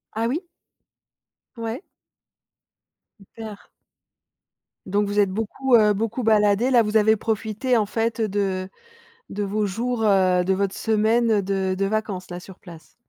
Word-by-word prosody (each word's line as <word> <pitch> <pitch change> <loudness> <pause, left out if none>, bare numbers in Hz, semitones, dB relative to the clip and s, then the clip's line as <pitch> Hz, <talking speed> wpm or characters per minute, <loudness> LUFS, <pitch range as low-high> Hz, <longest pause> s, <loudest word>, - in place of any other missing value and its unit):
Ah, 225 +1 0
oui. 315 +10 -2 1.1
Ouais. 230 - -5 1.4
Super. 215 +1 -10 1.3
Donc 200 +2 0
vous 205 +1 -1
êtes 200 -2 +3
beaucoup, 225 +5 0
heu, 210 -2 +5
beaucoup 225 +4 -3
baladés, 210 +2 +3
là, 245 -3 +5
vous 210 +1 +1
avez 220 +1 +4
profité, 220 +3 -1
en 210 - +2
fait, 225 +2 -2
heu, 220 - +1
de 190 -2 -2 0.6
de 205 - -3
vos 210 +2 -1
jours, 230 +4 -2
heu, 185 -3 +3
de 190 - +1
votre 195 0 -2
semaine 220 0 +2
de 190 -1 -1
de 195 +1 -1
vacances, 200 -3 -3
là, 175 - -5
sur 190 0 -13
place. 170 -3 -14
210 Hz, 145 wpm, -23 LUFS, 195-225 Hz, 1.4 s, heu